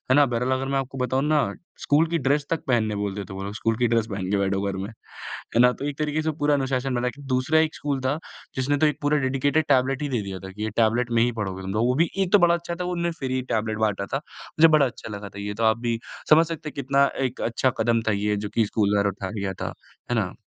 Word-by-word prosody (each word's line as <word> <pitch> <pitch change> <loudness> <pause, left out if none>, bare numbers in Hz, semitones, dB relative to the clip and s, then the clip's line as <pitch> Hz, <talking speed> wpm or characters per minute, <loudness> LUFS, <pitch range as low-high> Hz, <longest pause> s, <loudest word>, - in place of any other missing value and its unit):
ना? 145 - +6
बहरहाल 125 0 -1
अगर 135 +1 -2
मैं 135 - +2
आपको 135 0 -5
बताऊँ 130 +1 0
ना, 150 -9 +2 0.3
स्कूल 155 +3 +3
की 170 - +1
ड्रेस 140 +2 +1
तक 165 - -1
पहनने 110 -4 +1
बोलते 100 0 -3
थे 95 - -9
वो 95 +1 -5
लोग, 100 +1 -5
स्कूल 115 +1 0
की 120 -1 +2
ड्रेस 115 -1 +1
पहन 95 -1 -3
के 100 - +2
बैठो 95 0 0
घर 95 - -5
में 100 +3 -4 0.4
है 115 - -2
ना? 125 0 +6
तो 140 - -7
एक 145 - -5
तरीके 150 +1 0
से 160 - 0
पूरा 145 0 +3
अनुशासन 135 -1 0
बना। 125 +1 0 0.3
दूसरा 145 +5 +3
एक 160 -1 0
स्कूल 140 -2 -2
था, 130 +4 0 0.4
जिसने 140 +2 +1
तो 155 - +4
एक 150 -1 0
पूरा 145 +1 +2
डेडिकेटेड 140 +3 +1
टैबलेट 135 0 +2
ही 145 - -1
दे 120 -6 -1
दिया 95 -1 -5
था 95 0 -8
कि 105 +3 -7
ये 110 - -2
टैबलेट 115 +1 +2
में 115 -1 +3
ही 120 0 +2
पढ़ोगे 95 -2 -3
तुम 95 0 -4
लोग। 110 +3 +2
वो 125 - +2
भी 170 - +1
एक 190 -1 0
तो 205 - +8
बड़ा 170 -1 +5
अच्छा 170 0 -3
था 180 +1 -4
वो 180 - -2
उन्होंने 170 0 -1
फ्री 130 -1 -2
ही 130 - 0
टैबलेट 110 0 -1
बाँटा 105 -2 0
था - - +2 0.4
मुझे 165 +1 +8
बड़ा 155 -3 +5
अच्छा 120 - -7
लगा 100 0 -7
था 100 +1 -9
ये 105 0 -4
तो 115 - -1
आप 110 +1 +3
भी 115 -1 -1 0.3
समझ 160 +2 +7
सकते 165 -2 -5
हैं - - -8
कि - - -3
कितना 140 +2 +3 0.2
एक 125 - -7
अच्छा 120 +3 +1
कदम 115 0 +2
था, 110 - +1
ये 105 +1 0
जो 105 0 -3
कि 115 -2 +3
स्कूल 100 -1 +1
द्वारा 100 0 +3
उठाया 95 0 -6
लिया 100 -2 -2
था। - - -2 0.4
है - - +2
ना? - - -1
125 Hz, 285 wpm, -24 LUFS, 105-145 Hz, 0.4 s, तो